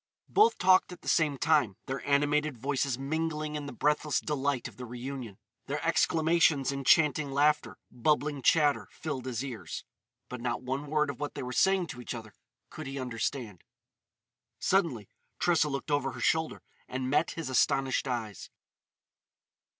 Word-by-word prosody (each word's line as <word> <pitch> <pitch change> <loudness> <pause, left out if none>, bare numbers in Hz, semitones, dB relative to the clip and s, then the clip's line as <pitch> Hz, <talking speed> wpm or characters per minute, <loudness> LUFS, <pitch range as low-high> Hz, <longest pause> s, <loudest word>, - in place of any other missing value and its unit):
Both 430 +3 +4
talked 185 0 +4
at 180 - -10
the - - -11
same 150 -4 +2
time, 145 -10 +2
their 135 0 -4
animated 145 0 +2
voices 135 0 -1
mingling 155 +2 -2
in 145 -1 -4
the - - -6
breathless 150 +3 +1
delight 140 -3 -1
of - - -14
the 125 - -6
reunion. 125 -3 -6 0.3
Their - - -2
exclamations, 160 -4 +3
enchanting 145 +2 +3
laughter, 150 +2 +2
bubbling 145 +3 0
chatter, 145 +1 +3
filled 135 -5 -5
his 125 +1 -3
ears. 110 -11 -6 0.4
But 125 -1 -7
not 120 +1 -2
one 135 +3 -3
word 150 0 +1
of 135 - -13
what 145 0 -4
they - - -4
were 125 0 -5
saying 190 +3 +3
to 125 - -7
each 125 - -5
other 110 -3 -9 0.4
could - - -7
he 135 +1 -5
understand. 115 - -4 0.9
Suddenly 160 - +1 0.3
Tressa 165 -4 +2
looked 140 +1 -4
over 135 -3 0
her 125 - -8
shoulder 160 +6 0 0.2
and 130 0 -3
met 150 +4 +2
his 165 - -3
astonished 130 +1 +1
eyes. 115 -6 -4
140 Hz, 160 wpm, -30 LUFS, 125-150 Hz, 0.9 s, Both